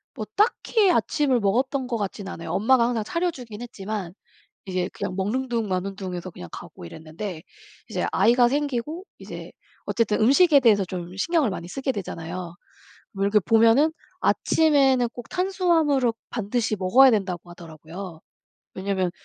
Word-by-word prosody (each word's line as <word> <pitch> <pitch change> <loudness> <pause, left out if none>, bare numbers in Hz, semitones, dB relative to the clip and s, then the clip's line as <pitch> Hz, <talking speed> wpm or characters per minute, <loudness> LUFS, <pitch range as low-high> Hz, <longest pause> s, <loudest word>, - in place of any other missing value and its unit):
뭐 215 -4 -5
딱히 420 -1 +2
아침을 290 -7 +2
먹었던 255 +6 0
것 245 -2 -3
같지는 195 -1 -5
않아요. 165 - -8
엄마가 235 +3 +3
항상 230 -3 -1
차려 340 +9 -1
주긴 240 -7 -9
했지만 200 -5 -6 0.5
이제 185 -1 -2
그냥 185 - -5
먹는 240 +7 -1
둥 230 -3 -1
마는 190 +1 -2
둥 185 -2 -5
해서 175 +1 -5
그냥 90 - -10
가고 - - -10
이랬는데 160 - -7 0.5
이제 - - -2
아이가 240 +1 +4
생기고 290 +4 -2
이제 - - -9 0.3
어쨌든 210 0 0
음식에 280 +6 +6
대해서 210 -6 +4
좀 180 0 -7
신경을 315 - +1
많이 175 -3 -5
쓰게 265 +7 -2
되잖아요. 175 -3 -6 0.6
뭐 195 0 -2
이렇게 205 +1 +4
보면은 230 - +4 0.3
"아침에는 270 -6 +3
꼭 245 - -10
탄수화물을 340 -9 +2 0.2
반드시 225 0 -1
먹어야 210 +8 +6
된다."고 185 -6 -1
하더라고요. 165 +1 -10 0.5
왜냐하면 190 -1 -1
220 Hz, 355 characters per minute, -24 LUFS, 185-265 Hz, 0.6 s, 음식에